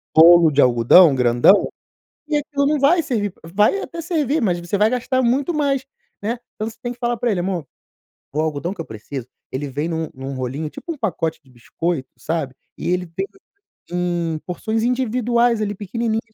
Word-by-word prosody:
rolo 165 0 +8
de 145 0 +4
algodão 125 +7 +6
grandão, 120 +9 +4 0.6
e 300 - 0
aquilo 285 -1 -1
não 295 +1 +2
vai 325 +5 +4
servir 205 -8 -1 0.2
vai 210 - +3
até 335 -1 -6
servir, 315 -3 0
mas 180 -6 +1
você 175 +3 -2
vai 210 +2 +4
gastar 255 +2 0
muito 265 +7 +1
mais, 280 -3 0 0.4
né? 230 +3 -2 0.2
Então 215 - -3
você 225 - -15
tem 240 -1 -3
que 245 - -10
falar 240 -1 0
para 240 - 0
ele: 195 - 0
"Amor, 175 -5 -3 0.6
o 150 - -3
algodão 160 +3 -2
que 185 - -6
eu - - -7
preciso, 115 +4 -7 0.2
ele 140 +3 -3
vem 145 +4 -3
num 160 -1 -2
num 135 0 -6
rolinho, 130 +5 -3
tipo 330 - -7
pacote 175 - -2
de 135 - -23
biscoito, 135 +4 -4
sabe? 155 -5 -3 0.2
E - - -3
ele 180 0 0
tem 170 +4 -3 0.7
em 175 -2 -1
porções 220 +5 -2
individuais 240 -1 +1
ali, 205 -1 -1
pequenininhos. 220 +3 -2
195 Hz, 185 wpm, -21 LUFS, 160-245 Hz, 0.7 s, rolo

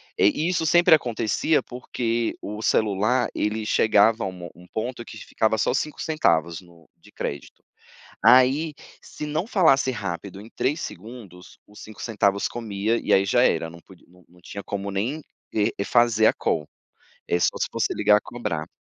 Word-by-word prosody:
eh, - - +4
e 155 +10 +1
isso 170 -3 0
sempre 175 +1 +5
acontecia, 120 +2 +1
porque 120 -2 -3
o 105 +2 -6
celular 110 +4 +1
ele 105 +1 -2
chegava 110 +1 +3
a - - -1
um 95 - -4
mo 90 -2 -10
um 90 0 -16
ponto 120 +2 -4
que 110 - -11
ficava 110 0 -1
só 115 - +1
5 150 +3 -3
centavos 85 - 0
no 85 -2 -20
de - - -21
crédito, 70 - -7 0.6
ai 135 +5 +5 0.3
se 150 - -8
não 155 +4 -2
falasse 160 - +3
rápido 100 -4 -6
em 110 - -13
3 150 +4 0
segundos, 95 - -10
os 105 - -15
5 110 -1 -11
centavos 100 -3 0
comia, 110 -1 -2
e - - -2
aí 95 - +5
já 120 +5 +3
era, 80 -5 +1
não 85 +1 -13
podi 95 - -19
não 90 +1 -22
não 90 +1 -22
tinha 100 +3 -8
como 100 0 -4
nem 115 +11 -2 0.3
e 105 -1 0
fazer 115 -2 +3
a - - +4
call, 75 -2 -2 0.6
e 85 - +1
só - - +1
se - - 0
fosse - - -1
ligar 105 - +4
a - - +1
cobrar. 110 -10 -5
110 Hz, 180 wpm, -24 LUFS, 95-125 Hz, 0.6 s, sempre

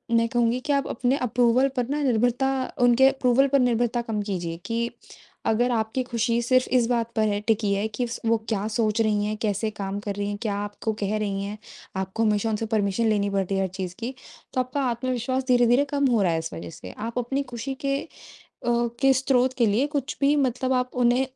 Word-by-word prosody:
मैं 230 0 +3
कहूँगी 240 +1 +1
कि 285 +3 -1
आप 275 -1 +1
अपने 255 +3 0
अप्रूवल 245 +2 +3
पर 245 -1 0
निर्भरता 255 -3 +1 0.3
उनके 245 +2 +6
अप्रूवल 270 0 +3
पर 275 0 +3
निर्भरता 240 -1 +1
कम 225 -3 -3
कीजिए 175 -5 -3
कि 235 0 -1 0.6
अगर 240 +3 +2
आपकी 220 +2 0
खुशी 235 -1 0
सिर्फ 255 +2 +2
इस 235 -2 +2
बात 235 -1 0
पर 215 -1 +2
है 205 -1 0
टिकी 215 -2 +2
है 205 +2 0
कि 220 +3 -3 0.2
वो 225 0 +3
क्या 210 -1 -1
सोच 220 0 0
रही 210 -2 +1
हैं, 215 +1 -2
कैसे 215 0 -1
काम 200 -1 -4
कर 205 -1 -4
रही 200 0 -2
हैं, 205 - -3
क्या 210 -3 -1
आपको 205 +2 -3
कह 205 +1 0
रही 200 -2 -2
हैं, 205 +1 -5 0.4
आपको 190 +4 -2
हमेशा 215 +1 +1
उनसे 220 +1 -1
परमिशन 210 +2 +1
लेनी 205 -1 +1
पड़ती 195 -1 -1
है 195 - +1
हर 190 - +1
चीज़ 185 -2 -4
की, 235 +3 -4 0.4
तो 255 - 0
आपका 255 +3 -3
आत्मविश्वास 255 +2 -1
धीरे-धीरे 245 +2 +4
कम 280 -1 +1
हो 225 - +3
रहा 180 -3 +2
है 165 - 0
इस 160 0 -6
वजह 85 +1 -7
से, 90 +2 -10
आप 230 - -6
अपनी 270 +4 -1
खुशी 265 +3 -4
के 275 0 +1
अ, - - -10 0.6
के 240 +3 +2
स्रोत 260 -1 +2
के 240 - +4
लिए 225 +7 +2
कुछ 275 -2 -2
भी 280 +2 +4
मतलब 260 -1 +1
आप 250 0 0
उन्हें 245 +2 +3
230 Hz, 215 wpm, -25 LUFS, 210-250 Hz, 0.6 s, उनके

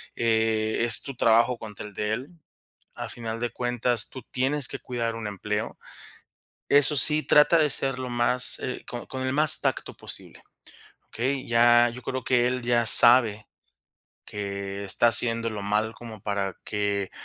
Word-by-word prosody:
eh, 110 -1 -1
es 120 -1 +5
tu 140 - -8
trabajo 115 +1 +1
contra 105 -2 -10
el 105 - -12
de 105 +2 -3
él. 125 +6 -6 0.7
A - - -7
final 115 -1 -7
de 120 - -2
cuentas, 120 -1 0
tú 130 - -10
tienes 135 +1 -1
que - - -7
cuidar 115 -2 -5
un 115 -1 -7
empleo. 105 +2 -5 0.9
Eso 145 +1 +4
sí, 150 +2 +6
trata 150 +3 +3
de 155 -2 +1
ser 135 -1 0
lo 130 - -6
más, 120 +1 +2
eh, 125 - -7
con 120 -1 -9
con 130 -1 -7
el 130 - -2
más 150 +1 +3
tacto - - -3
posible, - - -10 0.7
¿okey?, 130 +3 -4
ya 120 +1 +4
yo 125 +2 -11
creo 130 0 -6
que 125 -2 +1
él 125 0 -3
ya 120 -1 0
sabe 115 -4 +6 0.8
que 100 -1 -7
está 100 +4 +1
haciéndolo 115 -3 +1
mal 105 +2 -2
como 110 -3 -12
para 100 -2 -4
que, 100 -2 -3
120 Hz, 165 wpm, -24 LUFS, 110-125 Hz, 0.9 s, sí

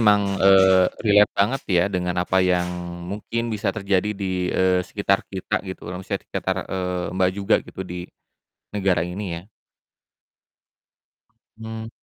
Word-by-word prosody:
emang, 105 -2 +5 0.2
eee, 95 -1 +6 0.2
relate 105 -1 +5
banget 115 +8 +2
ya 90 -3 +4
dengan 90 0 -1
apa 95 +1 +2
yang 90 -1 +2 0.4
mungkin 110 +5 -3
bisa 105 +1 -1
terjadi 100 -1 0
di, 95 -2 -2
eee, 95 0 +2
sekitar 100 +1 0
kita 95 -2 -2
gitu, 95 -1 -8
eee, 90 - -5
maksudnya 95 - -3
tuh - - -52
sekitar, 95 0 -1 0.2
eee, 90 -1 -2
Mbak, 95 -1 +3
juga 100 -1 +2
gitu - - -10
di 90 0 -7 0.6
negara 95 -4 +1
ini 90 +4 -4 0.2
ya. 100 - -22 2.1
Mmm. 110 0 -7
95 Hz, 145 wpm, -23 LUFS, 90-105 Hz, 2.1 s, eee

